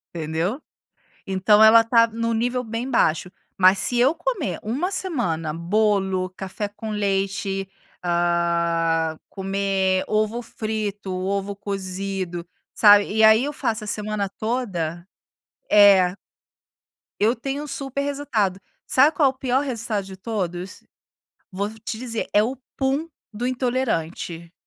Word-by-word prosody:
Entendeu? 165 - -2 0.7
Então 195 +2 +4
ela 225 +1 +8
está 230 0 +4
em 230 +1 -3
um 230 - +1
nível 245 +2 0
bem 230 +3 -4
baixo, 170 -7 +1 0.3
mas 190 +1 +5
se 245 - 0
eu 265 +6 +4
comer - - -2
uma 270 - -2
semana 210 - -2
bolo, 190 +1 +1
café 195 +2 -4
com 215 +2 -8
leite, 195 -1 -1 0.4
hã, 170 -2 +1
comer 195 -1 0
ovo 215 +3 0
frito, 215 -4 -4
ovo 195 +2 -2
cozido, 190 -3 -4 0.3
sabe, 205 -1 +6
e 220 +1 +2
aí 220 +3 +6
eu 290 - -3
faço 230 -6 -2
a - - -8
semana 210 -1 -2
toda, 190 -7 -3 0.6
é. 195 -3 +6 1.1
Eu 220 +4 +3
tenho 275 +4 -4
um - - -7
super 275 -1 -4
resultado, 250 -10 -1 0.3
sabe 280 +5 +5
qual 285 -4 +4
é - - -4
o - - -31
pior 260 0 +1
resultado 230 -7 -3
de 190 0 -9
todos? 185 -3 -4 0.7
Vou 200 +3 -2
te 220 +1 -5
dizer 230 -1 -4
é 210 - +6
o 250 +5 -2 0.2
pum 275 +4 0 0.2
do 225 +4 -3
intolerante. 220 -10 -2
205 Hz, 135 wpm, -23 LUFS, 185-240 Hz, 1.1 s, ela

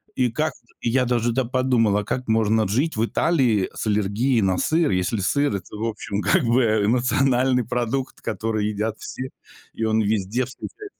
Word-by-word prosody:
И 125 -2 +1
как, 155 +5 -1 0.3
я 125 +2 +1
даже, 120 -1 +1
да, 130 - +1
подумал, 115 -5 +1
как 125 +4 -3
можно 110 -1 +2
жить 135 - 0
в 110 - +1
Италии 120 - +1
с - - -5
аллергией 105 +4 +1
на 95 -2 +1
сыр, 160 - +1
если 90 +4 0
сыр- 125 +5 +1
это, 95 +1 -7
в 110 +2 -3
общем, 105 -2 -3
как 190 -3 +2
бы, 120 +2 +3
э, 110 -2 +2
национальный 125 +1 +2
продукт, 125 +2 -2
который 110 0 -2
едят 105 +1 -2
все, 130 +1 -6 0.4
и 115 - -4
он 110 0 +2
везде 110 +3 0
встречается. 405 - -9
115 Hz, 175 wpm, -23 LUFS, 105-130 Hz, 0.4 s, бы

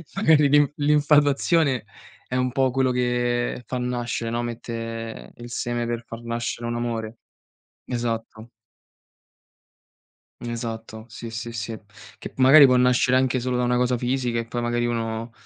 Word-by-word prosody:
magari 160 -7 +4
l'inf 145 0 +4
l'infatuazione 145 -1 +3 0.4
è 125 - -2
un 130 0 0
po' 130 -1 +2
quello 130 0 +1
che 120 0 0
fa 130 - -3
nascere, 120 -2 -2
no, 120 +1 -1
mette 115 -1 -6
il 120 0 -10
seme 120 0 -2
per 120 0 -4
far 115 +1 -8
nascere 115 0 -3
un 120 - -2
amore. 115 -1 -4 0.7
Esatto. 115 -1 -4 1.9
Esatto. 115 -2 -6
Sì, 115 +1 -8
sì, 115 +1 -5
sì, 115 0 -5 0.4
che - - -8
magari 135 +2 +8
può 125 - +4
nascere 125 0 +3
anche 130 0 +1
solo 125 0 -1
da 125 - +1
una 125 0 +1
cosa 125 0 +1
fisica 125 -1 -1
e 115 - -2
poi 120 +1 -4
magari 120 0 0
uno 115 -1 -3
120 Hz, 145 wpm, -24 LUFS, 115-130 Hz, 1.9 s, magari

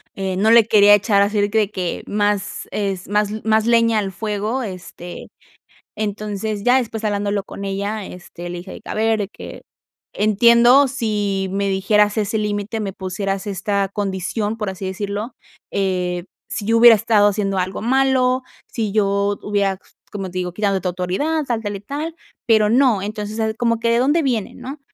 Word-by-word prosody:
eh, 190 -1 -3
no 215 +3 +3
le 230 -1 +7
quería 205 -2 +6
echar 205 0 +2
así 205 +1 +1
de 205 - +1
que 220 - -1
de 210 -1 0
que 180 -4 -3
más 205 -1 -1
es 195 -3 -3
más 210 +1 0
más 220 0 +2
leña 230 -2 +3
al 195 -2 -3
fuego, 215 +5 -2
este, 180 -3 -8 0.7
entonces 210 0 -3
ya 250 +1 +5
después 225 -3 -4
hablándolo 205 -1 -1
con 200 - -8
ella, 200 +1 -3
este, 175 -1 -9
le 175 - -5
dije 185 +2 -9
de - - -9
que: - - -14
"A - - -3
ver 220 0 +1
de 200 - -2
que - - -10 0.5
entiendo 235 +6 +5
si 205 -6 -1
me 200 0 0
dijeras 205 +2 +2
ese 220 +1 0
límite, 210 +1 -2
me 195 -3 -4
pusieras 195 +1 -3
esta 200 0 -1
condición, 205 +2 -2
por 210 -3 -3
así 190 0 -6
decirlo, 205 +4 -4 0.4
eh, 180 -2 -1 0.2
si 205 - -4
yo 225 +2 +3
hubiera 235 -1 +9
estado 210 -1 +3
haciendo 195 -1 -1
algo 185 +2 -2
malo, 260 +1 +2 0.3
si 220 -4 -3
yo 200 -1 +1
hubiera, 200 -2 0 0.3
como 195 -3 -5
te 185 - -5
digo, 180 -1 -3
quitándote 195 -3 0
autoridad, 185 - -1
tal, 230 -3 -1
tal 205 -1 -3
y 195 - -8
tal, 295 +9 -5 0.3
pero 215 -2 +4
no, 240 -5 +3
entonces, 210 +1 -5
o 225 - 0
sea, 220 0 -1
como 230 0 0
que, 230 - +1
¿de 235 - +3
dónde 290 +6 +2
viene?", 240 -8 -1
¿no?, 270 +4 -8
210 Hz, 185 wpm, -20 LUFS, 195-225 Hz, 0.7 s, hubiera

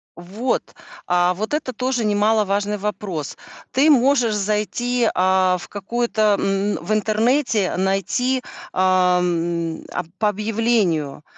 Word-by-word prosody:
Вот. 195 +9 -3 0.3
А 180 0 +2
вот 215 +8 -4
это 295 -4 -2
тоже 250 0 -1
немаловажный 210 -1 +1
вопрос. 195 -7 -4 0.3
Ты 285 +4 +4
можешь 255 -4 +3
зайти, 215 +4 0
а, 185 0 +2
в - - -10
какой-то, 215 0 0
м, 195 +1 0
в 185 - -5
интернете 220 0 +1
найти, 195 +8 0 0.3
ам, 180 -3 +1
а 180 - -2
по 210 +1 +2
объявлению. 210 -9 0
210 Hz, 110 wpm, -21 LUFS, 185-230 Hz, 0.3 s, Ты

